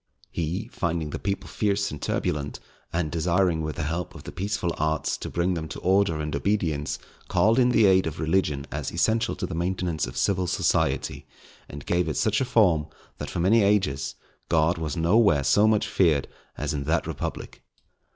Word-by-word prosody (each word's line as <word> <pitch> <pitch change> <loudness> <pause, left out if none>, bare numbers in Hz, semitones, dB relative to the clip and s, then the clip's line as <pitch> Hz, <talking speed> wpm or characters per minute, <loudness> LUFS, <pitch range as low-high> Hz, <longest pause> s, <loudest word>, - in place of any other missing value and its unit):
He 85 +6 -3
finding 85 -9 -2
the - - -4
people 100 +1 -3
fierce 100 -1 0
and 75 - -7
turbulent, 70 -1 -2 0.3
and 85 -2 -1
desiring 85 0 +1
with 80 -1 -3
the 85 - -3
help 85 +3 -3
of - - -10
the - - -7
peaceful 95 -2 -2
arts 80 0 0
to - - -6
bring 85 +2 0
them 80 -2 -3
to 70 - -7
order 95 -3 +2
and 75 -1 -3
obedience, 80 -3 -1 0.3
called 115 +4 +3
in 125 -1 +4
the 115 -3 +4
aid 95 -2 +4
of 80 0 -5
religion 80 -4 0
as 75 -2 -3
essential 110 +6 +1
to - - -3
the - - -6
maintenance 85 -2 -1
of - - -8
civil 95 -2 +1
society, - - 0 0.4
and 70 0 -9
gave 85 -1 +1
it 75 - -2
such 110 +1 +2
a - - +1
form, 95 -11 +3 0.3
that - - -5
for - - -4
many 110 +6 +4
ages 75 -10 +1 0.3
God 80 +1 +2
was 80 -2 -3
nowhere 85 -3 +4
so 105 +10 +4
much 110 -1 +3
feared 80 -7 +2 0.3
as - - -2
in 70 -2 -3
that 80 +3 +1
republic. - - -5
85 Hz, 190 wpm, -26 LUFS, 75-100 Hz, 0.4 s, in